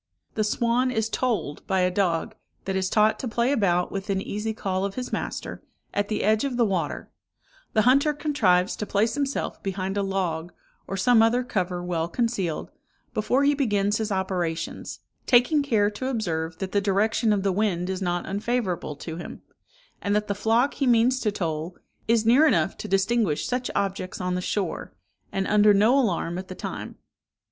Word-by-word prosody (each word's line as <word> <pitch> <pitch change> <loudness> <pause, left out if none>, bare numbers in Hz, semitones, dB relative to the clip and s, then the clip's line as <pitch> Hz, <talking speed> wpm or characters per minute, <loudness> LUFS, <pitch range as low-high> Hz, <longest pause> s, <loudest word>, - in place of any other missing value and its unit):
"The 215 - 0
swan 235 +4 +1
is 225 -3 -1
tolled 225 - -1
by 190 -1 +2
a 180 0 +2
dog, 180 -4 0 0.3
that 195 - -2
is 190 -1 0
taught 215 +1 +3
to 260 - -3
play 235 +3 +1
about 180 -9 +1
within 195 0 -2
easy 210 +3 -3
call 190 -3 -2
of 200 0 -3
his 250 -1 -5
master, - - -4 0.3
at 205 0 0
the 215 - -2
edge 215 +1 +3
of 270 -3 -2
the 235 - +4
water; 190 -5 -2 0.6
the 215 - +3
hunter 275 +5 +4
contrives 240 - +2
to 210 - -4
place 215 +3 +1
himself 280 -1 -2
behind 195 0 -3
a - - +2
log, 180 -4 -2 0.3
or 195 - -3
some 225 +4 +5
other 235 +3 +3
cover 180 -6 -2
well 170 -2 -1
concealed, 195 -5 -2 0.4
before 245 +6 +1
he 285 +1 +4
begins 205 -7 +1
his 220 -1 -2
operations, 180 -4 -3 0.3
taking 255 +5 +5
care 215 -7 +2
to 235 +5 -4
observe 165 -10 -2
that 190 -1 -4
the 200 - +2
direction 210 +3 +2
of 200 -2 +1
the 195 - +2
wind 185 -3 0
is 190 0 -3
not 175 -1 -1
unfavourable 200 -6 -2
to 160 +3 -7
him, 175 - -8 0.6
and 205 0 0
that 210 0 0
the 200 - 0
flock 225 +6 +2
he 275 - -1
means 245 +2 +4
to 215 -4 0
toll 165 -2 -3 0.3
is 225 -1 +3
near 260 +8 +6
enough 195 - +2
to - - -7
distinguish 195 -3 +1
such 250 0 -2
objects 195 -2 -2
on 180 0 -1
the 180 - -1
shore, 185 -1 -3 0.4
and 195 -1 -1
under 210 0 +5
no 215 +6 +4
alarm 180 -9 0
at 185 - -8
the 185 - -7
time. - - -6
205 Hz, 185 wpm, -25 LUFS, 185-235 Hz, 0.6 s, near